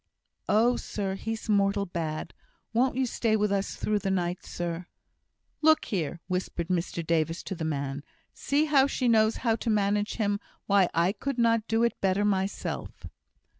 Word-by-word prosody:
"Oh, 235 +3 +4
sir! 195 -2 -3
he's 225 +3 -5
mortal 200 -1 +2
bad! 160 -3 -4 0.4
won't 250 +3 +2
you 260 0 +1
stay 230 -2 0
with 210 -1 +1
us 200 0 -1
through 210 -1 0
the 195 -1 -2
night, 180 -1 -1
sir?" 175 0 -4 0.7
"Look 315 0 +5
there!" 170 -4 -2
whispered 180 -2 -3
Mr 170 -2 -1
Davis 165 +1 0
to 190 - -4
the 170 -3 -5
man, 140 -2 -3 0.3
"see 290 +2 +1
how 280 -3 +4
she 255 -2 -1
knows 220 -1 +4
how 225 -1 +4
to 235 - -3
manage 205 0 +1
him! 205 -2 0 0.3
Why, 195 -3 +4
I 170 +3 +3
could 255 +6 -4
not 230 -2 +2
do 225 +1 +2
it 235 - 0
better 195 +1 +2
myself!" 195 -1 -2
200 Hz, 170 wpm, -28 LUFS, 175-225 Hz, 0.7 s, Look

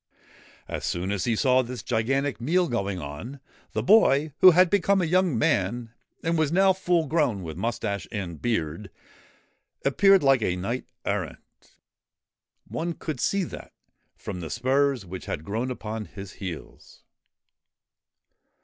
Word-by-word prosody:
As - - -5
soon 90 +3 -2
as 100 -2 -1
he 120 -2 +1
saw 130 +2 +3
this 125 -2 -6
gigantic 135 +4 0
meal 175 +8 +2
going 100 - -2
on, 85 - -7 0.3
the 110 - -1
boy, 150 - +4
who 185 - +10
had 180 +1 +6
become 200 0 +3
a 180 - +1
young 180 -4 +2
man 110 +3 0 0.3
and 165 0 +1
was 155 -2 +1
now 190 +2 +4
full 175 -3 +1
grown 140 - 0
with 80 -2 -6
moustache 100 0 -3
and 90 -6 -5
beard, 100 -4 -2 1.0
appeared 195 +6 +5
like 135 -3 +4
a 90 -4 0
knight 115 +8 -3 0.2
errant. - - -2 1.3
One 170 +1 -3
could 155 -5 -5
see 195 +9 +1
that, - - -9 0.4
from 90 - -7
the 80 -2 -6
spurs 130 -1 +1
which 95 +1 -8
had 80 - -4
grown 115 +7 -2
upon 110 -3 -5
his 100 -2 -10
heels. 90 -5 -9
125 Hz, 145 wpm, -26 LUFS, 100-160 Hz, 1.3 s, who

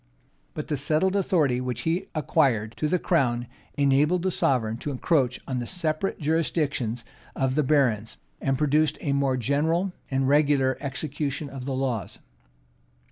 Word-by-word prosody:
But 150 - -4
the 150 - -1
settled 155 +7 +1
authority 160 -10 +2
which 125 -2 -3
he 165 +6 -1
acquired 120 -7 +1
to 155 - 0
the 180 - +2
crown 125 -9 +1 0.3
enabled 145 +5 +3
the 185 - +1
sovereign 115 -8 +1
to 145 - -5
encroach 135 -2 +1
on 130 -2 -2
the 120 - -4
separate 175 +1 -1
jurisdictions 145 -7 -1 0.3
of 130 -1 0
the 150 - +2
barons, 130 -7 +1 0.2
and 135 -1 0
produced 150 +1 +2
a 140 - 0
more 140 -2 +1
general 160 - 0 0.2
and 135 0 +1
regular 140 -2 +3
execution 140 +1 -3
of 130 -2 -7
the 135 -1 -2
laws. 125 -7 -2
140 Hz, 150 wpm, -26 LUFS, 130-155 Hz, 0.3 s, enabled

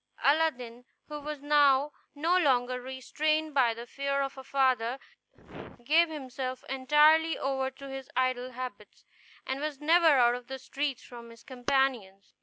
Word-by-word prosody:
Aladdin, 260 -6 +1 0.3
who 300 0 -6
was 295 -1 -7
now 290 -1 +3 0.2
no 325 +5 +1
longer 255 -7 +1
restrained 305 +5 -2
by 255 -4 +3
the 235 +1 -8
fear 275 +2 -2
of 275 - -5
a 265 - -10
father, 260 -3 +1 0.9
gave 320 +6 +3
himself 260 -3 -6
entirely 300 +5 +3
over 265 -1 -2
to 275 +1 -12
his 270 -1 -8
idle 255 0 -1
habits, 240 -5 -9 0.4
and 265 +1 -4
was 300 -2 -4
never 330 +3 +4
out 240 -1 +4
of 245 0 -7
the 265 - -6
streets 275 0 -4
from 235 -1 -12
his 230 0 -16
companions. 245 -7 -2
265 Hz, 150 wpm, -29 LUFS, 250-295 Hz, 0.9 s, never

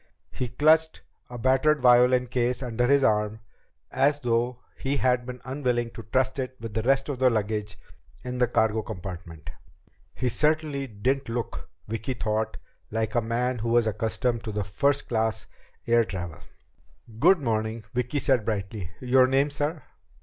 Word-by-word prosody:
He 125 - -3
clutched 155 +6 +3 0.3
a 125 - -7
battered 130 +5 +3
violin 125 0 +5
case 125 +1 -1
under 120 0 0
his 140 +1 +4
arm, 105 -1 +1 0.5
as 140 +3 +2
though 120 0 0 0.2
he 140 +1 -2
had 125 -2 +1
been 125 0 -6
unwilling 125 -3 -1
to 115 - -9
trust 130 +4 0
it 130 0 -3
with 115 -2 -7
the 110 - 0
rest 135 +3 +2
of 140 -4 -4
the 130 -1 +5
luggage 105 -2 -2 0.5
in 125 0 -4
the 125 - +4
cargo 110 -2 +1
compartment. 85 -7 -8 0.6
He 125 - -1
certainly 150 +1 +1
didn't 130 +5 -1
look, 115 -1 -4 0.2
Vicki 115 +4 -3
thought, 110 -1 -2 0.3
like 110 0 -2
a 120 - +2
man 120 +2 -1
who 115 +2 -2
was 120 0 +4
accustomed 110 +2 -1
to 105 -2 -2
first 140 +9 0
class 110 -2 0 0.4
air 115 0 +4
travel. 90 -5 -6 0.8
"Good 190 +9 +6
morning," 110 -4 -2
Vicki 125 +3 -1
said 130 -5 +2
brightly. 100 -3 -3
"Your 130 0 +4
name, 135 +2 +2
sir?" 150 +1 -2
120 Hz, 155 wpm, -26 LUFS, 110-130 Hz, 0.8 s, Good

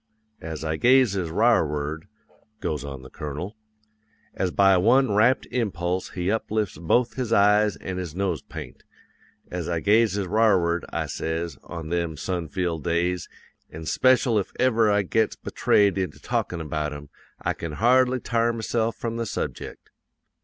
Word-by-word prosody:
"'As 80 -2 -6
I 80 0 -1
gazes 120 -8 +3
r'arward,' 80 -7 +1 0.5
goes 75 -3 -3
on 70 -2 -7
the 65 - -12
Colonel, 75 +8 -6 0.8
as 95 - -1
by 95 +1 +4
one 120 +5 +4
rapt 115 +5 +3
impulse 95 -6 -1
he 90 +1 0
uplifts 110 -5 -2
both 120 +9 +2
his 125 -4 -3
eyes 105 0 +4
an' 95 -1 -6
his 85 -4 -5
nosepaint, 95 -4 -4 0.7
'as 90 -2 -4
I 85 -1 0
gazes 105 0 +2
r'arward, 90 -4 +2
I - - -2
says, 80 -1 -4
on 80 -2 -7
them 85 -2 -2
sun 85 +1 -3
filled 85 -4 -2
days, 85 +1 -1 0.4
an' 80 +1 -9
speshul 125 - +3
if 95 - -4
ever 115 -4 +3
I 100 0 +3
gets 110 +3 +1
betrayed 100 -2 +2
into 90 -5 -3
talkin' 85 -2 -2
about 75 -1 -3
'em, 75 0 -9 0.3
I - - -1
can 80 -2 -6
hardly 125 +6 +3
t'ar 115 0 +1
myse'f 115 0 -1
from 115 0 -4
the 115 -1 -2
subject. - - -5
95 Hz, 150 wpm, -25 LUFS, 80-110 Hz, 0.8 s, by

